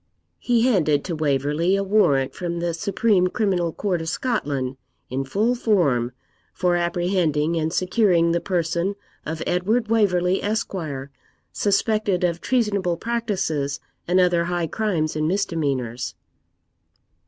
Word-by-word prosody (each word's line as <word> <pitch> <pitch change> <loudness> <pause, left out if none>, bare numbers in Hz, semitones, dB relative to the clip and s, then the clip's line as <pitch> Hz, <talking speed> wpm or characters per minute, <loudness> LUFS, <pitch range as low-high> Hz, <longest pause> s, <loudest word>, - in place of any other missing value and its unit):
He 240 -2 +2
handed 160 - +2
to 175 - -3
Waverley 150 +4 +1
a 195 - 0
warrant 190 -10 +2
from 170 -1 -4
the 170 0 -1
Supreme 200 +1 +2
Criminal 180 -4 0
Court 180 -1 -2
of 160 - -3
Scotland, 140 - -2 0.3
in 135 +1 -1
full 210 - +1
form, 160 - +1 0.4
for 180 -1 +1
apprehending 170 -3 +1
and 160 -1 0
securing 180 -2 +2
the 170 - +1
person 175 +1 -1 0.3
of 160 +1 -3
Edward 215 +6 0
Waverley, 190 -5 +2
Esq., 215 +1 -2 0.8
suspected 205 -2 +1
of 170 -1 0
treasonable 200 -8 0
practices 190 -12 -2 0.3
and 180 +2 +3
other 175 -2 +3
high 175 -1 -1
crimes 165 -5 -1
and 155 0 0
misdemeanours. 145 - -1
175 Hz, 125 wpm, -23 LUFS, 160-205 Hz, 0.8 s, and